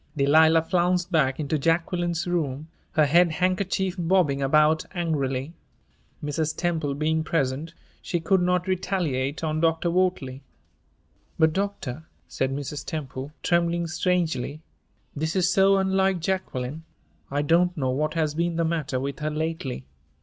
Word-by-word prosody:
Delilah 160 +3 +5
flounced 180 +1 +1
back 135 -5 +2
into 155 0 -1
Jacqueline's 170 +2 0
room, 155 -4 -2 0.2
her 155 - +4
head 170 +3 +4
handkerchief 185 +1 0
bobbing 165 -5 +2
about 150 +3 +3
angrily. 145 -4 -1 0.7
Mrs. 155 +1 -2
Temple 160 -5 -1
being 160 +2 0
present, 155 +1 -1 0.3
she 175 - -2
could 185 +3 +2
not 180 0 +1
retaliate 170 -7 -1
on 155 0 -1
Dr. 165 +1 +1
Wortley. 170 -8 0 1.0
"But, 160 -1 +3
doctor," 160 -7 -3 0.2
said 135 0 -2
Mrs. 140 0 -4
Temple, 140 -3 -5
trembling 170 0 +1
strangely, 165 -4 -1 0.5
"this 160 +3 -2
is 180 -1 +2
so 195 +1 +5
unlike 190 -1 +2
Jacqueline. 160 -5 -3 0.5
I 145 +1 0
don't 175 +4 +2
know 130 -3 0
what 155 +4 -1
has 155 -2 0
been 170 +2 -1
the 165 0 +1
matter 155 -5 -1
with 140 +1 -4
her 150 0 -1
lately. 155 - -3
160 Hz, 135 wpm, -25 LUFS, 145-175 Hz, 1.0 s, Delilah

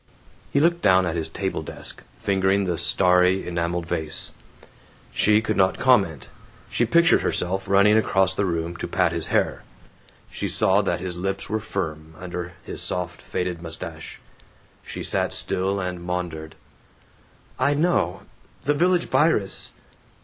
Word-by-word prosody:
He 140 - +3
looked 170 +3 +2
down 95 -1 +4
at 85 -1 -2
his 80 -2 -2
table - - -3
desk, - - -8 0.2
fingering 95 0 +1
the 90 -2 0
starry 90 +1 +3
enameled 85 0 -2
vase. 80 -2 -3 0.8
She 105 +1 +4
could 110 -1 -1
not 95 -1 +3
comment. 100 - +2 0.4
She 120 - +2
pictured 170 +8 +4
herself 95 +2 -1
running 100 +2 +5
across 95 -4 +2
the 100 0 0
room 85 0 -2
to - - -4
pat 90 -1 +1
his 85 -1 -2
hair. - - 0 0.7
She - - -3
saw 95 +2 +3
that 95 - -1
his 90 -1 -4
lips 95 +2 -3
were 110 - +1
firm, 80 -7 -5
under 90 -1 -6
his - - -5
soft 90 -2 -2
faded 90 -2 -3
mustache. 80 -1 -7 0.6
She - - -7
sat - - +1
still 95 +2 0
and 90 -2 -4
maundered, 85 -3 -4 1.0
"I 140 +3 +2
know. 145 - +1 0.4
The 145 - +2
Village 175 +3 +2
Virus. 150 -11 +1
95 Hz, 145 wpm, -24 LUFS, 85-105 Hz, 1.0 s, running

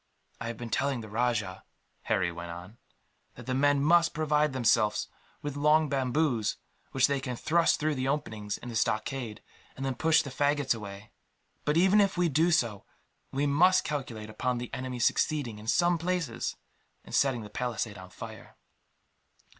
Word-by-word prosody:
"I 115 - -4
have 115 -1 -5
been 120 -2 -7
telling 135 -1 0
the 110 - -9
rajah," 105 -4 -1 0.4
Harry 90 -1 +1
went 85 0 -7
on, 90 +6 -9 0.6
"that 125 - -11
the 130 - -2
men 140 +1 +3
must 170 +2 +4
provide 150 -1 +2
themselves 110 -4 +2 0.4
with 145 -1 -4
long 150 +1 +3
bamboos, 130 -3 0 0.3
which 130 -1 +4
they 140 -1 +1
can 125 -2 -4
thrust 165 +6 +2
through 155 0 +1
the 130 -1 -2
openings 110 -8 -2
in 120 - -9
the 115 - -6
stockade, 110 +1 -1 0.3
and 135 -1 -3
push 160 0 +4
the 140 - -7
faggots 145 0 +1
away. 105 -2 -9 0.5
But 150 +2 +2
even 190 +4 +5
if 195 -2 +1
we 175 -1 +3
do 160 +4 +3
so, 115 - +1 0.5
we 140 +2 0
must 175 +6 +4
calculate 115 -7 -4
upon 125 +3 -1
the 120 0 -6
enemy 130 -1 -4
succeeding, 120 -2 0
in 110 - -11
some 175 +7 +3
places, 170 -7 -2 0.5
in - - -13
setting 130 -5 +2
the 105 - -10
palisades 115 -4 -3
on 95 0 -11
fire." - - -10
130 Hz, 170 wpm, -29 LUFS, 110-150 Hz, 0.6 s, even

